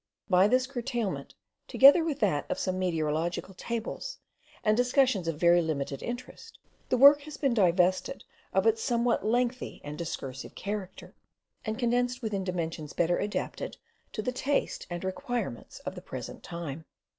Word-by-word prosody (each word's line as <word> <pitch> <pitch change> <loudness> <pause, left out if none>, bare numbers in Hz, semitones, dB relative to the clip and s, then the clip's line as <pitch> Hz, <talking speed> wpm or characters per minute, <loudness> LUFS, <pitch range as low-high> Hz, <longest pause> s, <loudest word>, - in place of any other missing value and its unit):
By 185 +2 +6
this 255 +3 +3
curtailment, 240 -5 -3 0.3
together 280 +5 +7
with 305 -3 -2
that 145 -1 +1
of - - -1
some 185 -1 -1
meteorological 165 +1 -1
tables 235 - -4 0.5
and 215 - +4
discussions 245 - +2
of 165 -2 -1
very 175 0 +5
limited 140 -4 -3
interest, 250 - -7 0.3
the 255 - +2
work 285 +3 +8
has 300 +1 -9
been 275 -4 +1
divested 185 -3 +2 0.3
of 190 +2 +2
its 225 0 +3
somewhat 235 0 +1
lengthy 245 +3 0
and 150 +2 -7
discursive 135 -5 -5
character, 200 -2 -5 0.5
and 220 0 -2
condensed 245 +1 0
within 205 -3 -1
dimensions 165 -4 -3
better 175 0 +1
adapted 210 - -3 0.4
to 215 - -3
the 250 - 0
taste 275 +3 -1
and 175 0 -5
requirements 190 - -4
of - - -5
the - - -9
present - - -7
time. 165 -2 -6
210 Hz, 150 wpm, -29 LUFS, 175-245 Hz, 0.5 s, work